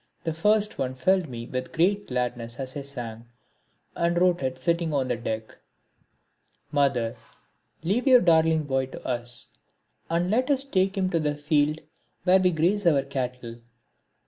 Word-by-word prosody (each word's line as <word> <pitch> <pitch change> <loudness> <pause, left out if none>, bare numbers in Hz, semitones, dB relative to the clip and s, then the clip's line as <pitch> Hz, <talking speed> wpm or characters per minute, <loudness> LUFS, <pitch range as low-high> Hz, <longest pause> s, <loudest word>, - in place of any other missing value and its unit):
The 165 - -2
first 210 +5 +1
one 130 -1 -2
filled 185 +3 +1
me 115 -2 -6
with 130 +1 -4
a - - -25
great 200 +5 +1
gladness 125 -1 -3
as 130 0 -4
I 145 - -3
sang, 120 -5 -7 0.7
and 170 0 +1
wrote 180 -2 +3
it 130 -1 -2
sitting 170 +4 0
on 130 -2 0
the 125 - +1
deck: 110 -1 -5 1.1
Mother, 135 -6 +1 0.7
leave 215 - 0
your 255 -2 +8
darling 160 -2 +4
boy 135 -2 -1
to - - -11
us, 120 -1 -2 0.6
And 170 +3 0
let 255 +5 +1
us 275 -2 +3
take 195 -7 0
him 185 -1 0
to 170 - +2
the 150 -1 -1
field 150 +1 +1 0.4
where 185 +1 +5
we 185 -1 +3
graze 180 +4 +1
our 140 -5 +4
cattle. 125 -3 -5
150 Hz, 165 wpm, -26 LUFS, 130-180 Hz, 1.1 s, your